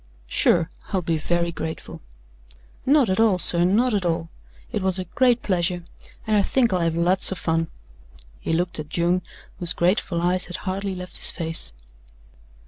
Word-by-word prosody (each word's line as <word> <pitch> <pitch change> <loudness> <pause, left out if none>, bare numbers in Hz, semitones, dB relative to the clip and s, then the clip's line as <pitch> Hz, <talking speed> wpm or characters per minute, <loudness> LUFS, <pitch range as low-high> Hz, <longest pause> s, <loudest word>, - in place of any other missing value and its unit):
"Sure! 165 - +2 0.2
I'll 190 -3 0
be 165 -1 0
very 170 +2 0
grateful." 160 -1 -6 0.9
"Not 280 -2 +5
at 190 +2 0
all, 220 -4 +4
sir 170 -1 +4
not 220 +7 +2
at 200 -2 0
all. 165 -1 -1 0.4
It - - -2
was 190 0 +1
a 185 - -2
great 245 +7 +2
pleasure 175 -2 0 0.4
and 215 - +1
I 205 - +5
think 235 0 +1
I'll 180 - +1
have 165 -1 0
lots 180 +4 +3
of 190 - -3
fun." 165 0 0 0.7
He - - -4
looked 175 0 0
at 150 -1 -6
June, 175 +2 +1 0.4
whose 175 0 +5
grateful 180 0 +1
eyes 180 +2 +1
had 175 - -7
hardly 195 0 -2
left 180 0 -3
his - - +2
face. 165 - -1
180 Hz, 175 wpm, -23 LUFS, 170-190 Hz, 0.9 s, Not